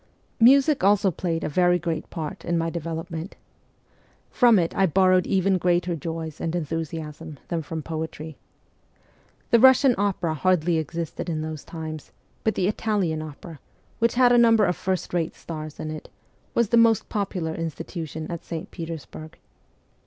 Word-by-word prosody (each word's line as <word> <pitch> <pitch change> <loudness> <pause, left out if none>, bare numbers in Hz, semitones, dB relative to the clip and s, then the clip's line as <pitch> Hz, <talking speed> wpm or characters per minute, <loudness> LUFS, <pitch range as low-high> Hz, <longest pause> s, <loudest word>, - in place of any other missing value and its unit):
Music 275 +5 +5
also 200 -1 +4
played 165 0 -2
a - - -1
very 175 +3 +3
great 165 -2 -4
part 155 -3 -6
in 170 0 0
my 165 0 -1
develop 165 +1 -5
ment. 165 +4 -6 1.0
From 240 -4 +5
it 170 -2 0
I 195 - +3
borrowed 185 +1 +3
even 190 -1 +2
greater 175 0 +1
joys 160 0 -6
and 165 +1 -2
enthusiasm 160 -1 -5
than 170 -2 -1
from 160 +1 -6
poetry. 160 -1 -5 1.2
The 235 - +6
Russian 260 +1 +6
opera 190 -5 0
hardly 170 0 +2
existed 165 +2 -4
in 155 -2 -2
those 155 -2 -6
times; 155 -2 -7 0.3
but 220 - +1
the 185 - +1
Italian 200 -7 -1
opera, 155 +1 -9 0.4
which 230 0 +2
had 250 0 +5
a 240 - +6
number 225 -3 +5
of 180 -1 0
first 185 0 -3
rate 170 -2 -1
stars 155 -2 -8
in 155 - -4
it, 155 - -8 0.5
was 235 -3 +2
the 235 - +4
most 230 -2 +4
popular 190 -6 -2
institution 160 -1 -5
at 170 - -5
St. 165 -1 -6
Petersburg. 160 -2 -8
170 Hz, 160 wpm, -24 LUFS, 160-195 Hz, 1.2 s, The